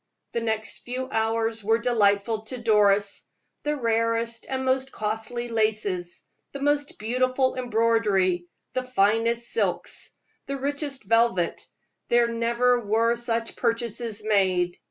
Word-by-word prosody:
The 235 - -1
next 220 -1 -2
few 255 +1 -4
hours 225 0 0
were 225 +2 +3
delightful 220 -2 +2
to 255 +3 -6
Doris. 205 -3 +2 0.3
The 295 0 -1
rarest 230 -1 0
and 265 0 -2
most 260 +1 +1
costly 225 +3 -3
laces, 215 -6 -1 0.3
the 280 - -5
most 290 +1 0
beautiful 255 +4 +1
embroidery, 220 -7 +1 0.3
the 255 - 0
finest 230 0 +1
silk, - - 0 0.6
the 275 - -3
richest 285 -1 -3
velvet 230 -5 +2 0.5
there 240 0 +4
never 235 +1 +2
were 230 +2 +2
such 230 -1 -2
purchases 230 -2 -2
made. 185 -4 +2
230 Hz, 120 wpm, -25 LUFS, 215-245 Hz, 0.6 s, there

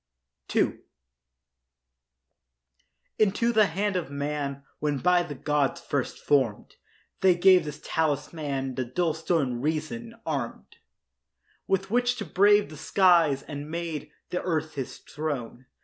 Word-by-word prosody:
II - - +2 2.4
Into 215 +3 +2
the 215 -2 +5
hand 195 +4 -1
of 175 -6 -2
man, 140 -1 -3 0.2
When 145 -1 0
by 180 +4 +3
the 155 -4 -5
gods 150 +3 0
first 145 -6 -2
form'd, 130 -8 0 0.4
They 185 -2 +5
gave 180 -1 +6
this 150 0 -6
talisman, 145 -3 -1
The 130 0 -2
dull 160 +6 0
stone 155 -7 0
Reason, 160 - -3
arm'd - - -4 0.9
With 195 +1 0
which 245 +1 +2
to 215 - -5
brave 205 +3 +4
the 155 - -9
skies 170 -7 +4
And 145 0 -7
make 160 -2 -4 0.2
the 180 - -1
earth 160 -3 -1
his 135 -3 -5
throne. 130 -5 -5
155 Hz, 125 wpm, -27 LUFS, 145-185 Hz, 2.4 s, gave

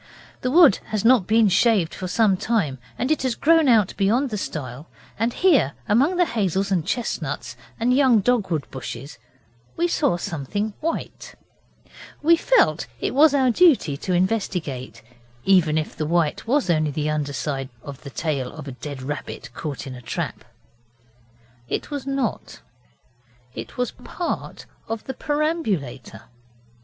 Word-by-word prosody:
The 255 - 0
wood 310 - +7
has 215 0 -3
not 235 -6 +5
been 220 0 +4
shaved 195 -3 +3
for 185 - -5
some 205 +1 +3
time, 180 - -1 0.2
and 255 - -1
it 310 - +1
has 255 -3 0
grown 325 -1 +4
out 220 -6 +4
beyond 230 +7 +2
the - - -2
stile 140 -3 -6 0.3
and 230 +2 +1
here, 285 - +3
among 270 - +3
the 355 - +4
hazels 195 - -1
and 180 -4 +2
chestnuts 150 - -3 0.2
and 240 +2 +2
young 260 -5 +5
dogwood 195 - 0
bushes, 130 0 -7 0.6
we 345 - +2
saw 285 - +1
something 175 +7 -3
white. 330 +1 -4 0.9
We 335 +3 +6
felt - - +2
it - - -2
was 290 +2 +5
our 260 -3 +3
duty 255 - +4
to 185 - -3
investigate, 175 - -2 0.4
even 175 -5 +4
if 155 - -3
the 155 - -3
white 170 +3 0
was 270 0 +2
only 155 -2 +1
the 150 +1 -1
under 150 -2 -2
side 135 -2 -3
of 140 -2 -9
the 140 - -8
tail 140 -4 -2
of 155 -2 -9
a - - -5
dead 135 +1 -7
rabbit 130 -4 -6
caught 145 0 -5
in 135 - -7
a 125 - -9
trap. - - -4 1.3
It - - -3
was 285 -2 -4
not 275 -4 -3 0.9
it - - -8
was 250 -1 -1
part 350 -2 -5 0.2
of 225 -1 -4
the 265 - -5
perambulator. 235 - -2
195 Hz, 155 wpm, -23 LUFS, -, 1.3 s, wood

